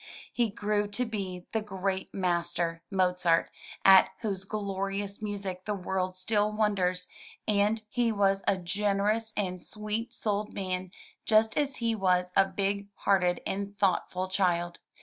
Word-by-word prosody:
He 235 -2 +2
grew 205 +1 0
to 205 +5 -1
be 190 -5 -5
the 220 - 0
great 190 -2 -3
master, 170 -2 0
Mozart, 180 -3 +2 0.3
at 190 -1 +8
whose 195 -4 -3
glorious 200 0 -3
music 200 -3 -4
the 210 - -1
world 185 -1 -2
still 210 +3 +1
wonders, 190 -4 0 0.4
and 210 +1 +2
he 235 +1 +1
was 195 -2 +2
a 195 - +3
generous 205 +4 0
and 185 -3 -2
sweet 215 +2 -3
souled 210 -1 -2
man, 185 -1 -3 0.3
just 220 0 +3
as 285 -2 0
he 230 -1 0
was 180 -3 +1
a 195 - +6
big 200 +1 -2
hearted 180 -3 +2
and 200 +1 -3
thoughtful 185 -1 +1
child. 175 -2 0
195 Hz, 140 wpm, -29 LUFS, 185-210 Hz, 0.4 s, at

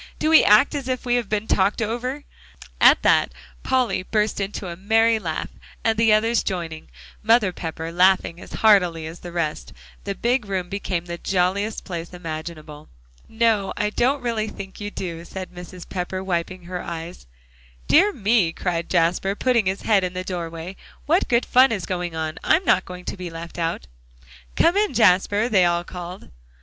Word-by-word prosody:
"Do 310 - 0
we 320 - +8
act 210 +7 +5
as 280 -3 -4
if 255 0 -3
we 245 - +1
had 245 -4 0
been 215 0 -1
talked 195 -1 +1
over?" 245 +6 -3 0.6
At - - +6
that, - - +3 0.3
Polly 250 -8 +1
burst 210 +3 -1
into 195 0 -4
a 170 - -6
merry 225 +4 +2
laugh; 165 -6 -4 0.3
and 225 -1 +2
the 225 0 +3
others 225 +2 +3
joining, 165 - -5 0.3
Mother 225 -4 +3
Pepper 165 -1 -5
laughing 180 -1 +2
as - - -12
heartily 180 -7 +4
as 160 +2 -8
the 175 - -9
rest, 165 -3 -3 0.3
the 200 -1 -4
big 240 0 0
room 185 -2 -3
became 190 -3 -3
the 170 0 -6
jolliest 195 +3 -1
place 175 -1 -6
imaginable. 155 -2 -8 0.4
"No, 220 -3 +1
I 210 0 0
don't 255 +4 +1
really 225 -3 -1
think 195 -1 -9
you 205 - -4
do," 170 -4 -6
said 185 +2 -8
Mrs. 180 0 -10
Pepper, 185 0 -4
wiping 180 0 -3
her 180 +1 -5
eyes. 170 - -7 0.6
"Dear 390 +7 +5
me!" 210 - +2
cried 170 -2 -3
Jasper, 180 +3 +1
putting 235 -3 +1
his 190 +1 -2
head 205 -4 +3
in 180 0 -2
the 185 0 -4
doorway, 170 0 -6 0.3
"what 335 +5 +2
good 235 0 +2
fun 255 +1 +5
is 200 -5 -2
going 175 -2 -3
on? 160 -1 -4
I'm 365 +4 +3
not 185 - +3
going 180 0 -9
to - - -5
be 180 -1 -6
left 170 +1 -8
out." 165 - -2 0.7
"Come 340 - +3
in, 415 0 +1
Jasper," 205 +1 +3
they 195 -6 +4
all 175 0 +1
called. 180 +1 -9
190 Hz, 180 wpm, -22 LUFS, 175-225 Hz, 0.7 s, we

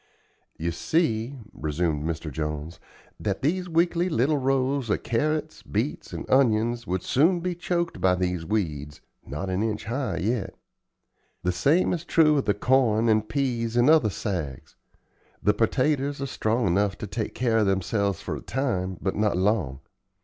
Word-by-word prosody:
"You 85 +2 -2
see," 120 - 0 0.2
resumed 75 0 -1
Mr. 80 -1 -4
Jones, 75 +2 -4 0.4
"that - - -2
these 180 +5 0
weakly 170 +2 +2
little 145 +1 +2
rows 135 -1 0
of - - 0
carrots, 150 +6 -1
beets, - - -3
and - - -6
onions 120 -2 +2
would 90 0 -1
soon 170 +7 +3
be 180 +1 -2
choked 175 -1 -2
by 90 -1 +4
these 90 -2 -1
weeds, 75 -7 -3 0.3
not 75 +8 -4
an 95 +2 0
inch 110 -2 -2
high 125 +4 -2
yet. 105 +2 -1 0.9
The 90 - +2
same 145 - +2
is 170 -2 -3
true 155 -4 +4
of - - -2
the 100 - +2
corn 115 -1 +3
and 110 0 +2
peas 120 -5 -1
and 120 +5 +6
other 155 -9 +5
sags. 85 - -4 0.7
The 105 - +4
pertaters 140 +5 +1
are 140 - -2
strong 115 -3 0
enough 100 +2 +1
to - - -5
take 105 +3 -4
care 115 -2 +2
of 105 - +2
themselves 95 0 0
for - - -4
a - - -7
time, 95 -9 -2
but 95 - 0
not 105 -3 +1
long. 90 - 0
110 Hz, 165 wpm, -26 LUFS, 95-140 Hz, 0.9 s, and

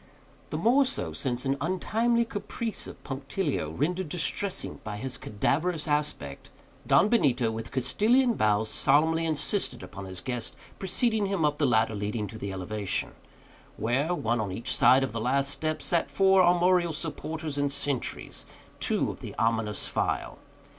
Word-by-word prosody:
The - - -3
more 255 +5 +4
so, 270 +1 -1
since, 125 -3 -2
with 135 - +2
an - - -5 0.2
untimely 235 +5 +1
caprice 225 +1 -4
of - - -11
punctilio, 135 - -2
rendered 170 - -2
distressing 180 +4 -2
by 105 -1 -5
his 130 +3 -3
cadaverous 155 - -1
aspect, 150 - -2 0.4
Don 190 - +5
Benito, 130 - +2
with 115 0 -6
Castilian 235 - +3
bows, 110 - +2
solemnly 160 +7 +3
insisted 160 +6 0
upon 100 0 -8
his 95 -1 -5
guest's 125 +1 -4 0.2
preceding 215 +2 +1
him 195 -5 0
up 150 0 0
the 145 - +3
ladder 110 -2 +2
leading 105 +1 -2
to 110 - -9
the 100 - -4
elevation; 95 0 -2 0.7
where, 135 - 0
one 115 -6 0
on 100 -3 -3
each 115 +6 -1
side 130 +1 +6
of 135 - -2
the 115 0 -4
last 135 +3 +2
step, 155 0 -2
sat 165 -5 +1
for 190 +6 +4
armorial 175 -1 +3
supporters 155 -1 -3
and 145 0 +1
sentries 140 -2 -2 0.3
two - - 0
of - - -11
the - - -8
ominous 115 -2 0
file. - - -2
145 Hz, 160 wpm, -28 LUFS, 115-180 Hz, 0.7 s, side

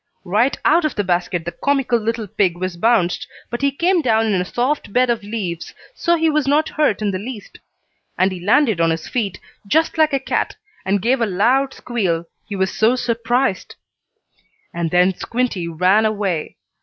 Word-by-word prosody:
Right 215 +9 +1
out 330 +2 +4
of 310 - -1
the 205 - 0
basket 175 -2 -1
the 175 - -3
comical 270 -2 0
little 225 0 -2
pig 195 -4 0
was 185 0 -3
bounced, 180 -2 +1 0.2
but 240 - -3
he 280 - +3
came 345 +5 +2
down 225 -5 +2
in 200 -4 +1
a - - -3
soft 250 +4 -1
bed 250 +2 +3
of 230 -1 -1
leaves, 200 -5 -5 0.2
so 345 -7 +1
he 325 -1 +1
was 305 -3 +1
not 300 +3 +2
hurt 255 -9 0
in 205 - +1
the 185 - -3
least. 220 0 -9 0.6
He 185 0 +1
landed 215 - +2
on 165 - +3
his 165 0 -2
feet, 210 -7 -2 0.3
just 320 +6 +1
like 310 -1 +4
a 275 - +2
cat, 265 - -2 0.3
and 195 0 0
gave 245 +1 +2
a 230 - +2
loud 250 +8 +1
squeal, 185 -9 -2 0.2
he 205 - -5
was 190 -1 0
so 225 +3 +3
surprised. 240 -3 -1 1.0
And 170 -1 -2
then 180 +2 +3
Squinty 230 -4 -2
ran 185 +6 +3
away. 200 -7 -2
220 Hz, 185 wpm, -19 LUFS, 185-255 Hz, 1.0 s, out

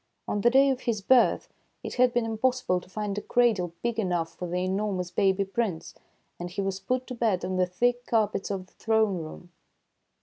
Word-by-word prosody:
On 205 - -1
the 240 - +5
day 270 +2 +5
of 260 - -2
his 235 -4 -1
birth 245 +5 +3 0.4
it - - -5
had 250 0 +4
been 240 -1 0
impossible 225 -4 0
to 180 - -18
find 205 0 -3
a - - -9
cradle 215 -9 +2
big 235 -1 -1
enough 175 -5 -1
for 180 - -6
the 180 +1 -1
enormous 190 -2 -2
baby 195 +2 +2
Prince, 195 -4 -3 0.5
and 175 0 -5
he 180 - -7
was 195 -1 -1
put 255 +6 -2
to 255 - -7
bed 220 -7 0
on 185 0 -2
the 180 0 +2
thick 245 +7 0
car 220 -2 +3
pets 200 -1 -5
of 195 -2 -3
the - - -29
throne 220 -4 +1
room. 165 +2 -9
205 Hz, 210 wpm, -27 LUFS, 185-235 Hz, 0.5 s, the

